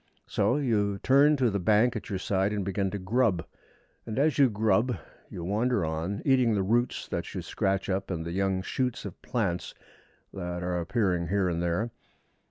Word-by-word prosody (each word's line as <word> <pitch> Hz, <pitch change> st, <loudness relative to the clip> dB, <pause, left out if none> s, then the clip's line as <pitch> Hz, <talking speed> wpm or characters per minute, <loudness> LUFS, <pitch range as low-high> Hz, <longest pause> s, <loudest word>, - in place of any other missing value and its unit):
So 125 Hz, -, +1 dB
you 105 Hz, -8 st, +1 dB
turn 140 Hz, +7 st, +4 dB
to 125 Hz, -4 st, +2 dB
the 100 Hz, -, -1 dB
bank 110 Hz, +6 st, +3 dB
at 110 Hz, -, -5 dB
your 95 Hz, -, -1 dB
side 95 Hz, +2 st, 0 dB
and 100 Hz, -2 st, -2 dB
begin 100 Hz, 0 st, -1 dB
to 105 Hz, -, -4 dB
grub; 100 Hz, -1 st, +1 dB, 0.6 s
and 110 Hz, 0 st, -6 dB
as 150 Hz, +2 st, +2 dB
you 135 Hz, -2 st, +6 dB
grub 110 Hz, +3 st, +1 dB, 0.3 s
you 85 Hz, -, -7 dB
wander 105 Hz, +1 st, +1 dB
on, 80 Hz, +6 st, -3 dB
eating 130 Hz, -5 st, +4 dB
the 100 Hz, -, +1 dB
roots 120 Hz, +5 st, 0 dB
that -, -, -3 dB
you -, -, -3 dB
scratch 95 Hz, 0 st, -1 dB
up 95 Hz, 0 st, -2 dB
and 85 Hz, -3 st, -3 dB
the 85 Hz, -, -4 dB
young 95 Hz, 0 st, 0 dB
shoots 125 Hz, +2 st, -2 dB
of 95 Hz, -, -8 dB
plants 105 Hz, -9 st, -2 dB, 0.6 s
that 90 Hz, -2 st, -4 dB
are 90 Hz, 0 st, -1 dB
appearing 90 Hz, -2 st, 0 dB
here 95 Hz, +1 st, +1 dB
and 85 Hz, -1 st, -1 dB
there. 85 Hz, +7 st, -1 dB
100 Hz, 185 wpm, -28 LUFS, 90-120 Hz, 0.6 s, you